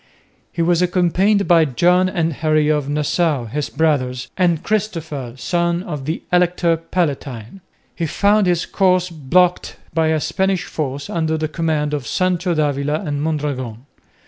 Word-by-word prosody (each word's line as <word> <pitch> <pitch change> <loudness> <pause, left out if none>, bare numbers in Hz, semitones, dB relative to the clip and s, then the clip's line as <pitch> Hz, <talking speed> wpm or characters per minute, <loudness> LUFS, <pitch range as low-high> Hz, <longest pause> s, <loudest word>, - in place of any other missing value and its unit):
He 170 - -1
was 175 0 +2
accompanied 185 +3 +2
by 170 -2 +5
John 180 +7 +3
and 165 -4 -1
Henry 155 0 +1
of 150 -2 0
Nassau, 150 -2 0
his 140 +6 -3
brothers, 130 -5 0
and 175 -3 +1
Christopher, 160 - -3
son 170 +4 0
of 150 -7 -6
the 160 +3 -3
Elector 175 -1 +3
Palatine. 145 - -3 0.3
He 165 - -2
found 205 +4 +2
his 175 -1 +1
course 185 -2 +1
blocked 170 +4 +1 0.2
by 160 0 +2
a 160 0 +2
Spanish 190 +3 0
force 140 -2 -4
under 160 -1 -1
the 155 0 -1
command 155 -2 -1
of 140 -5 -3
Sancho 180 - 0
d'Avila 145 0 0
and 145 -2 -2
Mondragon. 140 -6 -3
160 Hz, 145 wpm, -19 LUFS, 145-180 Hz, 0.3 s, by